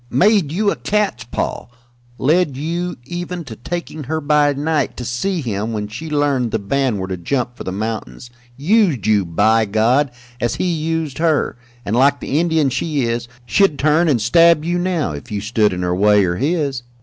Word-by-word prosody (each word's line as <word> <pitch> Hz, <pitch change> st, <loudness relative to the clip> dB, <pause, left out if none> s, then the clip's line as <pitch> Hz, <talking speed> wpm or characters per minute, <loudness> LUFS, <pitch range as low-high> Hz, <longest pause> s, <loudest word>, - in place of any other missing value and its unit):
"Made 185 Hz, -, +3 dB
you 200 Hz, +4 st, +1 dB
a -, -, -2 dB
cat's 210 Hz, -7 st, -1 dB
paw; 120 Hz, -, -3 dB, 0.5 s
led 150 Hz, 0 st, +2 dB
you 170 Hz, +4 st, -3 dB
even 175 Hz, +3 st, -5 dB
to 115 Hz, -7 st, -9 dB
taking 160 Hz, +3 st, -6 dB
her 160 Hz, +4 st, -2 dB
by 150 Hz, -1 st, +3 dB
night 150 Hz, +1 st, -1 dB
to 125 Hz, -, -5 dB
see 165 Hz, -, -1 dB
him 110 Hz, -2 st, -3 dB
when 105 Hz, -1 st, -3 dB
she 120 Hz, +10 st, -7 dB
learned 145 Hz, -5 st, +1 dB
the 110 Hz, -, 0 dB
band 120 Hz, +3 st, 0 dB
were 95 Hz, -1 st, -4 dB
to 95 Hz, -1 st, -4 dB
jump 120 Hz, +6 st, -2 dB
for -, -, -8 dB
the 95 Hz, -, -4 dB
mountains 110 Hz, +4 st, -5 dB, 0.3 s
used 165 Hz, -, +2 dB
you, 105 Hz, -3 st, +3 dB
by 110 Hz, +7 st, +2 dB
God, 115 Hz, +7 st, +2 dB, 0.3 s
as 120 Hz, -, -1 dB
he -, -, -2 dB
used 160 Hz, -2 st, -2 dB
her, 160 Hz, -3 st, +1 dB, 0.3 s
and, 105 Hz, -, -1 dB
like 140 Hz, +3 st, +4 dB
the 145 Hz, -, -1 dB
Indian 160 Hz, -5 st, +2 dB
she 150 Hz, -1 st, -1 dB
is, 120 Hz, 0 st, -2 dB, 0.2 s
she'd 145 Hz, -, +2 dB
turn 155 Hz, +4 st, +3 dB
and 130 Hz, -5 st, +2 dB
stab 165 Hz, +7 st, +4 dB
you 175 Hz, +1 st, 0 dB
now, 175 Hz, -, -1 dB
if 70 Hz, +5 st, -8 dB
you 105 Hz, -, -2 dB
stood 105 Hz, 0 st, +1 dB
in 90 Hz, 0 st, -3 dB
her 90 Hz, 0 st, 0 dB
way 105 Hz, +1 st, +4 dB
or 85 Hz, 0 st, -1 dB
his. 140 Hz, -, -1 dB
140 Hz, 195 wpm, -19 LUFS, 110-160 Hz, 0.5 s, like